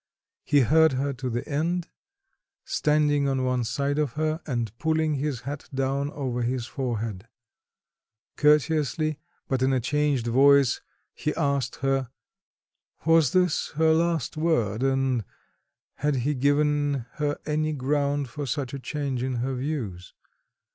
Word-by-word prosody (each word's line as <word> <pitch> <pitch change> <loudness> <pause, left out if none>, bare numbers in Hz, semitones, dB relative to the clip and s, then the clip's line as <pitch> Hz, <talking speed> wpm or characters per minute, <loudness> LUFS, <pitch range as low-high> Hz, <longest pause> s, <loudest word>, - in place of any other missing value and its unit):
He 145 -2 +4
heard 160 +4 +5
her 140 +2 -1
to 130 0 -4
the 120 0 -3
end, 165 +4 -1 0.8
standing 150 -2 +2
on 135 -1 0
one 125 -1 0
side 140 +5 -1
of 145 -6 0
her 155 +1 -1
and 120 -5 -2
pulling 160 -1 +1
his 140 -3 -2
hat 145 +2 -6
down 135 +1 -1
over 125 -4 -2
his 120 0 -1
forehead; 115 -6 -4 1.1
courteously, 150 0 +2 0.3
but 130 -1 -1
in 130 +1 +3
a 130 - +2
changed 145 0 0
voice, 135 +2 +4 0.3
he 150 - -3
asked 140 -5 0
her, 135 -2 +1 1.0
"Was 165 -4 +5
this 180 -3 +1
her 160 +1 +4
last 165 -3 0
word, 120 -10 +1
and 135 -3 +1 0.7
had 150 -1 0
he 130 +4 0
given 145 -1 +1
her 145 -1 -1
any 155 +1 0
ground 145 0 0
for 145 +3 -6
such 135 -1 -3
a 140 - -4
change 135 -2 -3
in 130 0 -1
her 125 +3 -1
views?" 125 - -4
140 Hz, 140 wpm, -26 LUFS, 130-150 Hz, 1.1 s, heard